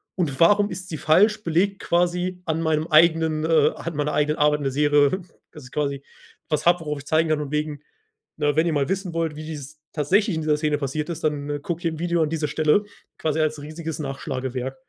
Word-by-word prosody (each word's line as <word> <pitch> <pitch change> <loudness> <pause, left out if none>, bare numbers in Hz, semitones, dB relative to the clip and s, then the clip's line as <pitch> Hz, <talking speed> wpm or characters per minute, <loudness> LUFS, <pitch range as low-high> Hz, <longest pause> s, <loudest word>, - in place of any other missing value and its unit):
Und 155 -8 -2
warum 205 +4 +4
ist 185 0 -6
sie 155 - -4
falsch, 210 +9 +3
belegt 185 +4 +1
quasi 180 +1 0
an 160 -1 -1
meinem 160 0 0
eigenen, 160 -1 +4
äh 155 -2 +4
an 165 -1 -6
meiner 150 0 -1
eigenen 150 +1 +1
Arbeit 150 0 +3
in - - -5
der 135 - 0
Serie, 145 +5 +3 0.3
dass 150 -4 -12
ich 125 - -13
quasi 140 -2 -2 0.5
was 150 - -1
habe, 175 +1 +5
worauf 150 -2 -4
ich 145 - -12
zeigen 160 +2 +2
kann 155 -1 +1
und 145 -2 -6
wegen: 150 -1 -2 0.6
„Ne, 145 -1 +1
wenn 160 - +3
ihr 165 - +1
mal 145 0 0
wissen 190 -2 -2
wollt, 165 -2 -1
wie 155 - -7
dies 150 -1 -8
tatsächlich 190 +6 +2
in 160 - -2
dieser 155 -1 +1
Szene 150 -1 0
passiert 150 +3 -3
ist, 170 - -5
dann, 145 -2 -1
äh, 145 - -2
gucke 170 +3 -4
hier 165 - +1
im 160 - -7
Video 170 -1 +1
an 155 - -1
dieser 160 -2 -1
Stelle,“ 155 +6 +2 0.4
quasi 155 0 -1
als 155 -1 -1
riesiges 155 +1 -6
Nachschlagewerk. 135 -2 -4
155 Hz, 225 wpm, -23 LUFS, 150-170 Hz, 0.6 s, habe